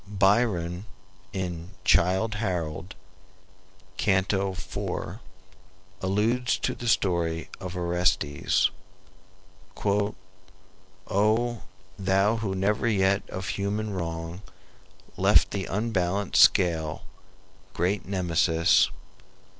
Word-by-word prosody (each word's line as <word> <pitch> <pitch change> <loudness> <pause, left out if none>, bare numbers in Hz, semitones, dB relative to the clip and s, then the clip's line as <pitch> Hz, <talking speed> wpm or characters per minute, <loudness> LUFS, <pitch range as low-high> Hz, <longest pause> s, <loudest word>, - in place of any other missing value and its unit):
Byron, 100 -3 +1 0.5
in 90 0 -5
"Childe 95 +6 +3
Harold," 90 -2 -3 1.0
Canto 95 0 +1
IV., 90 0 -5 0.8
alludes 110 +6 +1
to 125 - -1
the 120 - -7
story 85 -6 0
of 90 -1 -6
Orestes: 90 -4 +1 1.1
"O 100 +3 -2 0.4
thou 95 +3 +2
who 105 -4 -2
never 105 +5 +1
yet 100 -2 +1
of 95 0 -5
human 105 +1 -2
wrong 85 0 -4 0.8
Left - - +4
the 95 -2 -2
unbalanced 100 -2 +1
scale, 80 -4 +3 0.7
great 95 +4 0
Nemesis! 85 -3 +2
95 Hz, 80 wpm, -26 LUFS, 90-105 Hz, 1.1 s, Left